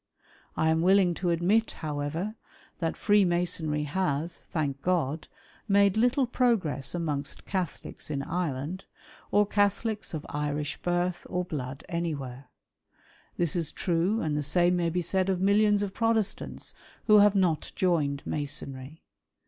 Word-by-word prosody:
I 160 - +3
am 160 0 +2
willing 185 0 +4
to 175 +1 -2
admit, 185 +7 +2
however, 155 +6 -3 0.5
that 165 -2 -1
Freemasonry 175 -6 +2
has, 160 0 -2
thank 140 -4 -2
God, 160 -3 0 0.4
made 200 -1 +4
little 245 +4 +3
progress 185 - 0
amongst 150 -5 -3
Catholics 185 -5 -4
in 140 -2 -2
Ireland, 165 +1 -3 0.4
or 205 0 +4
Catholics 205 0 0
of 155 - -6
Irish 150 0 -2
birth 175 0 -1
or 180 0 -1
blood 135 -6 -5
anywhere. 140 -6 -4 0.9
This 170 -2 0
is 165 -4 0
true, 180 +5 0
and 155 -2 -1
the 150 - 0
same 175 +4 +3
may 170 -1 +1
be 175 +1 -1
said 190 +3 +1
of 185 -2 +1
millions 205 +1 +3
of 195 -2 -4
Protestants 225 -3 -1 0.3
who 215 -1 +7
have 205 0 +5
not 175 -6 +1
joined 150 -6 +1
Masonry. 145 0 -4
175 Hz, 135 wpm, -28 LUFS, 150-195 Hz, 0.9 s, who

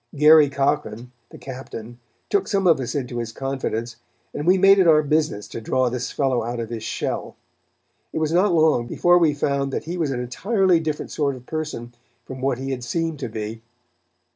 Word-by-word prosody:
Garry 150 0 +7
Cochran, 135 -4 -1 0.2
the - - -12
captain, 120 -3 -9 0.3
took 405 - 0
some 195 -2 0
of 165 -5 +5
us 130 +3 -4
into 125 -3 -3
his 115 -1 -4
confidence, 120 -3 -4 0.4
and 150 - -4
we 185 +2 +5
made 195 +1 +6
it 185 - +4
our 155 -1 +6
business 150 -7 0
to 115 - -7
draw 130 +3 +1
this 125 0 -4
fellow 130 -4 0
out 120 +1 -4
of 115 0 -5
his 115 -2 -4
shell. - - -4 0.8
It - - -5
was 160 0 0
not 185 +3 +3
long 155 -7 +3
before 175 +7 +3
we 155 -4 +3
found 140 -1 -1
that - - -3
he 175 +3 -5
was 160 -4 0
an 130 -2 -2
entirely 185 - +1
different 155 -2 -4
sort 140 -3 -1
of 125 - -12
a - - -32
person 150 -7 -5 0.3
from 130 -1 -8
what 135 -2 0
he 135 +1 -4
had 125 -2 -4
seemed 165 +2 -2
to 130 - -4
be. 110 +1 -6
140 Hz, 205 wpm, -22 LUFS, 120-160 Hz, 0.8 s, Garry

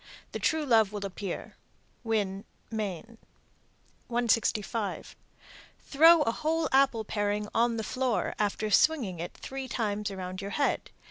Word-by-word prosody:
The - - -4
true 315 -1 +1
love 225 -6 +4
will 205 -1 -4
appear. 195 -1 -6 0.5
Winn, 205 -4 -1 0.3
Me. 205 -6 -3 1.0
165. 230 -2 0 0.6
Throw 320 +2 +6
a 230 - +1
whole 315 +4 0
apple 265 -4 +3
paring 205 0 -1
on 235 0 +2
the 220 - -2
floor, 255 +1 -1
after 210 +1 -1
swinging 230 - +3
it 170 - -6
three 270 0 -6
times 210 -4 -2
around 185 -1 -6
your 200 - -5
head. 285 - 0
220 Hz, 130 wpm, -29 LUFS, 205-260 Hz, 1.0 s, Throw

